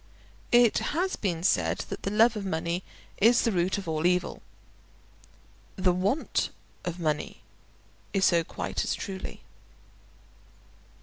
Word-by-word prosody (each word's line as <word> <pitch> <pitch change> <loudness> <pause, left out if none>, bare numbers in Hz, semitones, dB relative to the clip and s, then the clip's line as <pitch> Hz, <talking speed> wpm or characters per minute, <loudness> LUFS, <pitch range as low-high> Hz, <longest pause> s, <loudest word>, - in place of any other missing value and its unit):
It 240 -2 +5 0.2
has 375 +2 +1
been 175 -5 -2
said 85 - +1
that - - -5
the - - -2
love 225 +3 +4
of 210 - -3
money 170 -1 -2 0.4
is 230 +4 +5
the 230 - +2
root 180 0 +1
of 195 -3 -6
all 160 +1 +1
evil. 180 0 0 1.3
The 185 -2 +2
want 200 - 0 0.3
of 175 0 -4
money 155 -3 -2 0.7
is 195 -1 +2
so 170 -2 +4
quite - - -3
as - - -1
truly. 190 -2 -6
185 Hz, 130 wpm, -28 LUFS, 170-210 Hz, 1.3 s, It